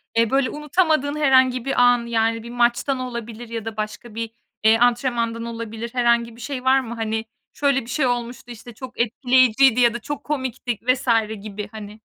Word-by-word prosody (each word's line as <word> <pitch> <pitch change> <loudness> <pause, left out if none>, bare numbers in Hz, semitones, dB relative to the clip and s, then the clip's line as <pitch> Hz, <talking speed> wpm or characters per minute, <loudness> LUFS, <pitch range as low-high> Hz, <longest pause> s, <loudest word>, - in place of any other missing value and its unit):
Eee, 230 -1 +3
böyle 270 -1 +2
unutamadığın 300 -1 0
herhangi 260 -4 +3
bir 270 - +1
an, 245 -1 +4
yani, 225 -1 0
bir 235 - -9
maçtan 240 +3 +1
olabilir 235 -2 -6
ya 230 -2 -5
da 225 -1 -6
başka 215 +1 -6
bir, 225 0 -4 0.3
eee, 220 +1 +6
antrenmandan 235 -1 +1
olabilir 230 0 -6
herhangi 235 -2 +1
bir 240 - -13
şey 260 +1 -5
var 260 +1 +4
mı? 235 -2 -6
Hani, 220 0 -2 0.3
şöyle 280 -2 +1
bir 230 - -13
şey 270 0 0
olmuştu, 245 0 -4
işte, 240 0 -11
çok 250 +1 -10
etkileyiciydi 250 +1 +3
ya 235 -1 +4
da 240 - -4
çok 290 +5 -5
komikti 260 -5 -3
vs. 255 0 +1 0.3
gibi 210 0 -6
hani. 215 0 -10
240 Hz, 185 wpm, -22 LUFS, 225-260 Hz, 0.3 s, eee